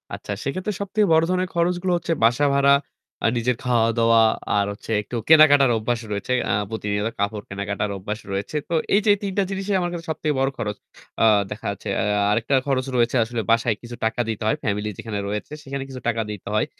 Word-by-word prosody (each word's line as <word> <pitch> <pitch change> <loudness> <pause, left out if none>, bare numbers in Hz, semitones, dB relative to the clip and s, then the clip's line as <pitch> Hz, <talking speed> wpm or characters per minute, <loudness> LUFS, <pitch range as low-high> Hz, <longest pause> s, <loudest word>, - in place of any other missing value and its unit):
আচ্ছা, - - -8
সেক্ষেত্রে 185 +9 -3
সবথেকে 205 +1 +1
বড় 160 +1 +5
ধরনের 185 0 0
খরচগুলো 175 +2 +1
হচ্ছে 170 -1 -2
বাসা 120 +6 +4
ভাড়া, 140 0 +5 0.5
আ - - +6
নিজের 120 +1 +1
খাওয়া-দাওয়া, 115 -1 +3 0.4
আর 100 - +2
হচ্ছে 110 - -9
একটু 120 - -8
কেনাকাটার 145 -5 +7
অভ্যাস 115 +2 -1
রয়েছে 105 +5 -2 0.2
আ - - +2 0.2
প্রতিনিয়ত 105 -1 -2
কাপড় 100 0 -1
কেনাকাটার 100 +1 -3
অভ্যাস 105 +3 -5
রয়েছে। 100 +10 -4
তো - - -2 0.2
এইযে 210 +1 +3
এই - - -1
৩ 195 - -2
টা 200 - +4
জিনিসই 195 +1 -1
আমার 175 0 -2
কাছে 170 0 -6
সবচেয়ে 155 -1 -1
বড় 135 0 +2
খরচ 105 -2 -3 0.5
আ - - +6 0.3
দেখা 105 - -7
যাচ্ছে 100 - -9
এয়া 105 -1 +1
আরেকটা 115 +5 +1
খরচ 130 -1 +1
রয়েছে 120 +1 +2
আসলে 115 0 -3
বাসায় 115 -1 +2
কিছু 120 0 -8
টাকা 115 +2 0
দিতে 110 0 -3
হয়। 110 - +2
ফ্যামিলি 105 0 -1
যেখানে 105 -3 -4
রয়েছে 105 +7 -4
সেখানে 140 -1 -5
কিছু 130 -2 -8
টাকা 115 -1 +1
দিতে 105 - -9
হয়। - - +2
120 Hz, 200 wpm, -23 LUFS, 105-155 Hz, 0.5 s, কেনাকাটার